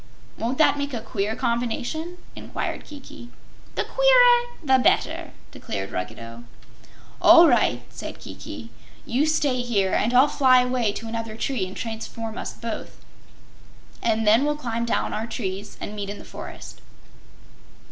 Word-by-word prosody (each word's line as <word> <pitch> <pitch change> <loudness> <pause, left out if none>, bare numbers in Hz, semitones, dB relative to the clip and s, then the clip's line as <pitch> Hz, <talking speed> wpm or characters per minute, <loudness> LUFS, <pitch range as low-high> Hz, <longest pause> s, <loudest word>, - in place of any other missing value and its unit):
"Won't 240 +4 -2
that 305 -2 +4
make 285 -2 -3
a - - -2
queer 215 -1 -2
combination?" 245 +8 -2 0.2
inquired - - -5
Kiki. 275 -4 -11 0.5
"The - - 0
queerer - - +5
the 265 -3 +4
better," - - +1 0.2
declared 95 0 -5
Ruggedo. 115 +5 -6 0.8
"All 335 0 +9
right," 215 - +2
said - - -7
Kiki. 115 +3 -9 0.3
"You 270 +6 +1
stay 285 -5 +1
here, 205 -6 +1
and 225 - +2
I'll 255 +3 +6
fly 260 -3 +5
away 250 -4 0
to 225 - -6
another 225 -1 -5
tree 230 -7 -1
and 185 - -9
transform 225 0 -5
us - - -4
both, 230 -1 -7 1.0
and 225 -1 +1
then 220 +5 +5
we'll 295 0 0
climb 235 -5 -2
down 235 - -1
our 220 +2 -3
trees 200 -3 -5
and 210 - -6
meet 200 -1 -4
in 205 - -5
the - - -12
forest." - - -9
235 Hz, 145 wpm, -24 LUFS, 210-280 Hz, 1.0 s, All